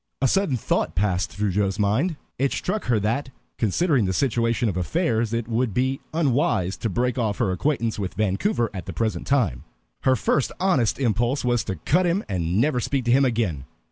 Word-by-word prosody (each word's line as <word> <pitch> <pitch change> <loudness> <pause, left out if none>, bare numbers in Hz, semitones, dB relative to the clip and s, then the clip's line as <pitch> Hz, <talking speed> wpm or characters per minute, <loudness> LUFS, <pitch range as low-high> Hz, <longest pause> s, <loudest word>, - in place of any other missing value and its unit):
A 135 - +3
sudden 175 -3 +1
thought 80 -7 -1
passed 95 -2 0
through 100 +5 -2
Joe's 100 0 0
mind. 110 - +1 0.2
It 135 +1 +2
struck 210 +3 -2
her 120 -3 +2
that, 115 +7 -1 0.3
considering 125 - +2
the 95 - 0
situation 115 0 +1
of 100 - -1
affairs, 115 - 0
it 115 -1 -2
would 115 -2 -1
be 130 +2 +1
unwise 125 - +1
to 115 - -2
break 125 +5 0
off 110 -3 0
her 110 -7 +1
acquaintance 115 - -1
with 95 -4 -4
Vancouver 110 - 0
at 90 -5 -7
the - - -5
present 110 -2 -2
time. 125 - +1 0.4
Her 130 -1 +3
first 135 +1 +1
honest 180 - +2
impulse 120 +2 0
was 120 -2 +2
to 95 - -3
cut 175 - +1
him 180 +4 +1
and 90 -1 -1
never 130 0 +2
speak 130 +1 -1
to 120 - +2
him 135 +2 +5
again. 110 - -1
115 Hz, 195 wpm, -24 LUFS, 100-135 Hz, 0.4 s, him